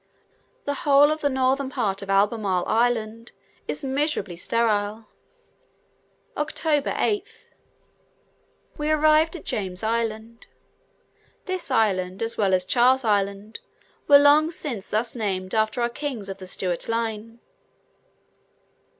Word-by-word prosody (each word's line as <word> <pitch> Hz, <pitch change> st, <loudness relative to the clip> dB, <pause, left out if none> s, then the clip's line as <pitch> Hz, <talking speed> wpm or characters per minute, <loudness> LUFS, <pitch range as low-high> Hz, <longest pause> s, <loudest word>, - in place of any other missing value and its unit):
The 285 Hz, -, -1 dB
whole 290 Hz, -2 st, +5 dB
of 310 Hz, 0 st, -3 dB
this 285 Hz, -, +1 dB
northern 265 Hz, +1 st, 0 dB
part 215 Hz, -7 st, -2 dB
of 195 Hz, -, -9 dB
Albemarle 195 Hz, -2 st, +1 dB
Island 230 Hz, 0 st, -1 dB, 0.3 s
is -, -, -2 dB
miserably 270 Hz, -, -1 dB
sterile. 215 Hz, +2 st, -1 dB, 1.3 s
October 300 Hz, -1 st, -1 dB
8th. 410 Hz, -2 st, -3 dB, 1.3 s
We 300 Hz, +1 st, -1 dB
arrived 310 Hz, +2 st, +3 dB
at 345 Hz, -, -9 dB
James 185 Hz, -2 st, -3 dB
Island: 225 Hz, 0 st, -3 dB, 1.0 s
this 370 Hz, -4 st, -3 dB
island, 195 Hz, -5 st, 0 dB
as 225 Hz, -, -1 dB
well 195 Hz, -3 st, +2 dB
as 180 Hz, 0 st, -1 dB
Charles 255 Hz, +5 st, +3 dB
Island, 200 Hz, 0 st, -1 dB, 0.5 s
were 285 Hz, -, +9 dB
long 290 Hz, +2 st, +5 dB
since 260 Hz, -, -5 dB
thus 225 Hz, +3 st, -1 dB
named 190 Hz, -5 st, -3 dB
after 220 Hz, +2 st, 0 dB
our -, -, +2 dB
kings 240 Hz, -6 st, -5 dB
of 195 Hz, -, -7 dB
the 185 Hz, -, -9 dB
Stuart 180 Hz, 0 st, -2 dB
line. 230 Hz, 0 st, -3 dB
230 Hz, 120 wpm, -24 LUFS, 205-285 Hz, 1.3 s, were